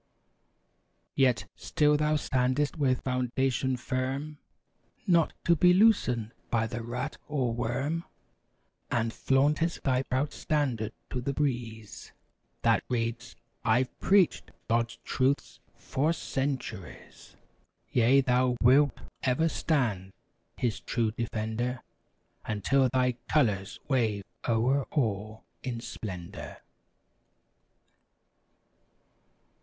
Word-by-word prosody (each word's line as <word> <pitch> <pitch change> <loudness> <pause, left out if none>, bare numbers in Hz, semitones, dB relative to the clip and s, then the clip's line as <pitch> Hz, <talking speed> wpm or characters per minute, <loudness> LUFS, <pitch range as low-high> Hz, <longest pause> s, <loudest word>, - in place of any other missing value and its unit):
Yet, 130 -3 +2
still 150 0 +2
thou 150 +1 +2
standest 130 0 0
with 135 -5 +1
foundation 130 0 0
firm, 135 +4 -3 0.7
Not 170 -3 +3
to 170 - +4
be 180 +2 +5
loosened 125 - +3 0.2
by 110 -2 +1
the 120 +2 -4
rat 120 +2 -4
or 130 -5 0
worm; 135 +8 -2 0.8
And 115 -2 0
flauntest 150 +5 +1
thy 130 -1 +2
proud 135 +2 -1
Standard 125 -8 -1 0.2
to 125 - -2
the 140 +3 -2
breeze 120 -7 -3 0.5
That - - +3
reads: 115 -1 -2 0.3
"I've 125 +3 +2
preached 195 -3 +3 0.2
God's 115 +1 0
truths 135 +2 0 0.2
for 145 +4 -1
cen¬ 140 -4 -1
turies!" 105 -7 -11 0.6
Yea! 125 +3 +5
thou 125 -1 +2
wilt 140 +4 +5 0.2
ever 130 +5 +2
stand. 115 - -1 0.4
His 120 -4 -1
true 115 -2 -1
defender. 115 +2 -3 0.6
Until 130 +6 +2
thy 125 -1 +1
colors 105 -10 +1
wave 115 -7 +1 0.3
o'er 125 +4 +2
all 110 -5 -2 0.2
in 125 -3 -4
splendor. 95 -7 -7
125 Hz, 100 wpm, -29 LUFS, 115-140 Hz, 0.8 s, be